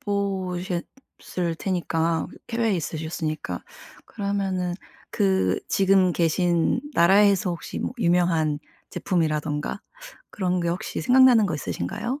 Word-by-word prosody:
보셨을 185 -2 -3
테니까 165 -3 -1 0.2
그 230 - -5
해외에 225 -4 +2
있으셨으니까 155 - -4 0.4
그러면은 195 -3 -2 0.4
그 190 -3 +1
지금 190 -2 +3
계신 170 0 +1
나라에서 195 +2 +4
혹시 170 - -5
뭐 - - -3
유명한 170 -5 +2 0.3
제품이라든가 155 -1 -1 0.5
그런 185 -2 -1
게 170 - -1
혹시 175 +2 -3
생각나는 250 -4 +6
거 165 - -2
있으신가요? 140 - -4
180 Hz, 275 characters per minute, -24 LUFS, 165-200 Hz, 0.5 s, 생각나는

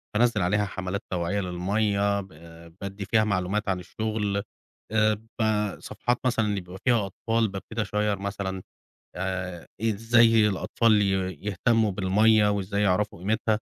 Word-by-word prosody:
بانزل 115 -1 +3
عليها 105 +4 +2
حملات 95 0 -4
توعية 90 +3 -1
للمَيّة، 100 +3 0
ب 95 - -11 0.5
بادي 100 0 -5
فيها 110 +1 +3
معلومات 100 +1 -1
عن 95 -1 0
الشغل. 105 +1 -2 0.5
آآ، 110 0 +3 0.3
ب 105 -3 0
صفحات 125 0 -2
مثلًا 120 -3 +2
اللي 100 -2 -1
بيبقى 90 +1 -11
فيها 115 -5 +3
أطفال، 115 +3 0
بابتدي 105 +3 -5
أشير 105 0 0
مثلًا 100 -1 -4 0.6
آآ، 90 -1 -4
إزاي 115 0 +4
الأطفال 105 +2 +2
ي 100 - +2 0.4
يهتموا 110 +1 +2
بالمَيّة، 105 +3 +4
وإزاي 100 0 -1
يعرفوا 100 -1 +1
قيمتها. 110 +3 0
105 Hz, 135 wpm, -26 LUFS, 95-110 Hz, 0.6 s, إزاي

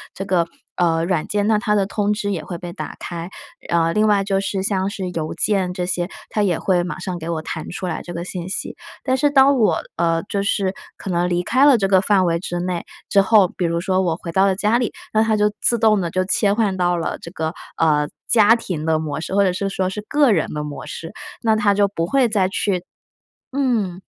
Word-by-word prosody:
这 195 - -5
个， 180 -3 +1 0.3
呃， 165 -1 +2
软 175 -3 -1
件， 205 0 0
那 215 -1 +3
它 210 0 +1
的 200 -2 +2
通 205 +1 -1
知 205 -1 -2
也 165 -5 -3
会 170 +3 -6
被 175 0 -7
打 155 - -6
开。 170 0 -6 0.4
呃， 165 -1 +2
另 215 0 +3
外 205 -2 +3
就 195 -1 0
是 195 -1 -2
像 195 -1 0
是 190 -3 -4
邮 160 -3 -4
件 190 -4 +1
这 180 -1 -2
些 175 0 -2 0.2
它 210 - 0
也 185 -5 +2
会 180 -2 +1
马 180 - -5
上 185 -2 -4
给 160 +1 -6
我 165 -2 -1
弹 160 0 -5
出 185 - -5
来 175 - -3
这 175 - -8
个 170 - -4
信 180 -1 -5
息， - - -4 0.3
但 260 -1 +1
是 290 +3 +2
当 275 -1 +5
我 195 -7 +3 0.2
呃， 165 0 +1
就 200 0 -2
是 200 -1 0 0.2
可 190 - -5
能 175 0 +1
离 175 0 0
开 260 +9 +3
了 270 - +7
这 195 -3 +1
个 190 -1 +4
范 195 -2 +3
围 170 -1 +1
之 175 -1 -4
内 180 -1 -2 0.3
之 200 - +5
后， 200 -1 +5
比 180 - -5
如 170 0 0
说 185 +1 +1
我 170 -3 0
回 170 - -7
到 190 +3 +3
了 190 - +2
家 210 +4 +2
里， 245 - -1 0.2
那 220 0 +4
它 220 -1 +1
就 210 0 +2
自 235 - +3
动 215 -3 +3
地 170 - -2
就 185 +2 0
切 200 +1 +2
换 210 -3 +1
到 175 -1 +1
了 165 - -3
这 - - -9
个 160 -2 -3 0.2
呃， 150 -2 +2 0.2
家 225 -1 +6
庭 180 -9 -4
的 160 -1 +2
模 150 -2 -3
式， 180 - -5
或 200 - +5
者 185 -2 +2
是 195 +2 -2
说 190 -1 -1
是 205 +2 -5
个 290 -3 +4
人 165 -6 +2
的 150 0 -3
模 150 -1 -7
式， 165 - -7 0.3
那 220 -1 +3
它 210 -2 +3
就 200 0 +3
不 165 -4 -2
会 265 0 +3
再 200 -4 +2
去 190 -2 -1 0.7
嗯。 230 -10 0
190 Hz, 265 characters per minute, -20 LUFS, 175-210 Hz, 0.7 s, 了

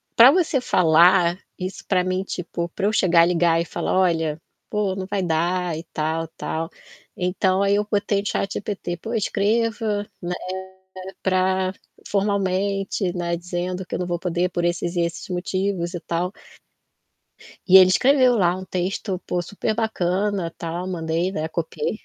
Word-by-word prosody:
pra 245 +4 +9
você 320 -6 +1
falar 175 -1 +4 0.2
isso 185 +1 -5
pra 180 -2 +2
mim, 185 +1 -1
tipo 170 -2 -4
pra 195 +3 -3
eu 215 - 0
chegar 170 -4 +5
e 175 - +1
ligar 170 -1 +3
e 170 - -3
falar: - - -2
"Olha, 165 -4 +1 0.3
pô, 205 -3 0
não 190 -1 -5
vai 200 -2 -1
dar 175 +1 0
e 165 - -6
tal, 160 +1 -1
tal". 160 +1 -3 0.5
Então, 185 +1 +1
aí 200 0 +3
eu 210 0 0
botei 200 -1 +1
no 205 - -4
ChatGPT: 195 -3 -3
"Pô, 225 +7 -6
escreva, 215 0 0
né, 180 0 -3 0.9
pra 185 0 +1 0.3
formalmente, 195 -1 0
né, 170 -1 -1
dizendo 180 +1 -4
que - - -5
eu - - -3
não 180 - -1
vou 175 -1 -2
poder 180 0 0
por 175 -1 -2
esses 175 +1 -1
e 175 - +2
esses 170 -1 -3
motivos 185 0 -2
e - - -3
tal". 175 +2 -2 1.4
E 190 - +9
ele 185 -1 +9
escreveu 255 +3 +4
lá 180 -3 +2
um 185 - -7
texto 185 +1 -2
pô, 175 - -1
super 205 +4 -3
bacana, 195 -4 -1
tal. 170 +2 -4
Mandei, 165 +1 -1
né, 160 -2 -2
copiei 165 +4 -3
185 Hz, 165 wpm, -23 LUFS, 175-200 Hz, 1.4 s, pra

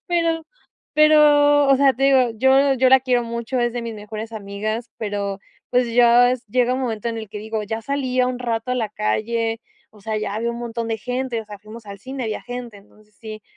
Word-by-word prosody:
Pero 330 -2 0 0.5
pero, 290 -2 +5
o 275 - +6
sea, 275 0 +4
te 270 +2 -1
digo, 260 -3 +4
yo 270 +3 +4
yo 260 0 +3
la 265 0 +6
quiero 250 -2 +1
mucho, 235 +2 -4
es 240 -1 0
de 240 -1 -4
mis 230 -1 -5
mejores 215 +1 -7
amigas, 215 +3 -4
pero, 200 -2 -4 0.3
pues, 245 -2 +1
ya 245 +1 +5
s 250 -1 -3
llega 250 +2 +1
un 265 - -2
momento 230 -2 -3
en 230 -1 -4
el 220 - -7
que 210 +1 -7
digo: 220 0 -4
"Ya 220 +2 -4
salí 260 -1 -1
un 250 0 -1
rato 235 0 -3
a - - 0
la 225 -3 -1
calle, 225 - -1 0.3
o 210 - -19
sea, 220 +2 -3
ya 210 0 -3
vi 230 - -3
a - - +1
un 235 - -7
montón 235 -1 -4
de 225 -1 -2
gente, 250 0 -3
o 220 - -10
sea, 205 -1 -10
fuimos 215 +2 -12
al 200 0 -9
cine, 260 +2 -6
había 215 -1 -4
gente". 245 -3 -7
Entonces, 210 +1 -23
sí. 215 -1 -8
235 Hz, 230 wpm, -21 LUFS, 215-255 Hz, 0.5 s, o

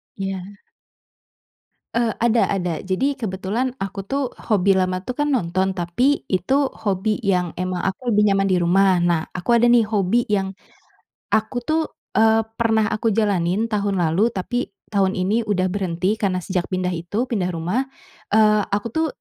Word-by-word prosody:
Iya. 195 0 -5 1.3
Eee, 235 -2 +1
ada 235 0 +3
ada. 175 -4 -1
Jadi, 265 +10 0
kebetulan 215 +4 -2
aku 195 0 -4
tuh, 275 +3 -1 0.2
hobi 195 -3 +3
lama 185 0 0
itu 245 +6 -6
kan 295 -1 +1
nonton, 190 -3 0
tapi 190 +11 +1
itu 265 +10 +1
hobi 205 +1 -1
yang 180 -3 +1
emang 185 0 -2
aku 215 +6 -2
lebih 210 0 +4
nyaman 195 0 +2
di 190 -2 +2
rumah. 185 +1 +3
Nah 170 -2 +1
aku 185 +6 +2
ada 235 - +4
nih, 240 -3 +4
hobi 210 +2 +2
yang 195 -2 0 0.8
aku 220 +3 +1
tuh, 315 +1 +1 0.3
eee, 220 0 +4
pernah 225 -2 +2
aku 225 +1 0
jalanin 200 -2 +1
tahun 205 -3 -1
lalu, 175 +6 +2
tapi 240 +4 -3 0.2
tahun 195 -1 +2
ini 200 +5 +1
udah 205 -4 0
berhenti 190 +1 -1
karena 190 -3 +1
sejak 180 0 -3
pindah 185 -1 -1
itu 175 +8 -2
pindah 200 -8 -1
rumah. 180 +11 -2 0.4
Eee, 215 0 +4
aku 205 +3 -1
tuh, 320 0 +1
200 Hz, 160 wpm, -21 LUFS, 185-225 Hz, 1.3 s, lebih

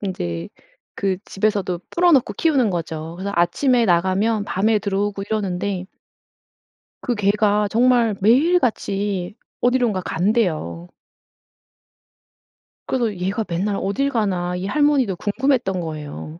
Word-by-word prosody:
인제 85 - -4 0.5
그 195 -2 -1
집에서도 195 -3 -1
풀어놓고 330 -11 +3
키우는 270 -8 +2
거죠. 165 -2 -4
그래서 200 +2 -4
아침에 235 +8 +2
나가면 195 +4 +1
밤에 210 +3 +1
들어오고 200 0 -2
이러는데 195 -2 -2 1.2
그 245 - -1
개가 210 0 +2
정말 235 -2 +3
매일 290 - +4
같이 200 - -2 0.3
어디론가 245 -6 +2
간대요. 160 - -1 2.0
그래서 235 -5 0
'얘가 190 +5 -2
맨날 190 +4 -1
어딜 270 +9 0
가나?' 185 -7 -1
이 180 - -4
할머니도 280 -6 +2
궁금했던 225 -3 0
거예요. 155 0 -7
200 Hz, 270 characters per minute, -21 LUFS, 180-230 Hz, 2.0 s, 매일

